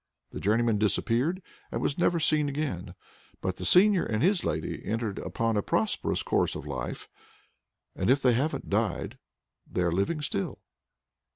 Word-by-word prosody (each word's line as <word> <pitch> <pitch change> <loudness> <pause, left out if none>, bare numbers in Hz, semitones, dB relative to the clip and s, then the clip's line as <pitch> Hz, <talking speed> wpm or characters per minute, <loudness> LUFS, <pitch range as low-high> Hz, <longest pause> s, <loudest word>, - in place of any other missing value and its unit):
The - - -6
journeyman 110 +1 +2
disappeared, 125 - +1 0.3
and - - -2
was 140 - -1
never 175 -1 +3
seen 150 -2 +2
again. 140 - -3 0.4
But 95 -1 -3
the 90 - -2
seigneur 195 0 +6
and 110 +3 -1
his 185 0 +3
lady 80 +1 -3
entered 110 -2 -2
upon 115 -1 -1
a - - +2
prosperous - - 0
course - - +1
of - - -6
life, 65 -4 -5 0.9
and 95 - -1
if 135 +2 +5
they 125 -3 +4
haven't 140 +7 -1
died, 105 -2 -1 0.5
they're 90 -1 0
living 125 - 0
still. 100 -8 -2
115 Hz, 155 wpm, -28 LUFS, 100-150 Hz, 0.9 s, seigneur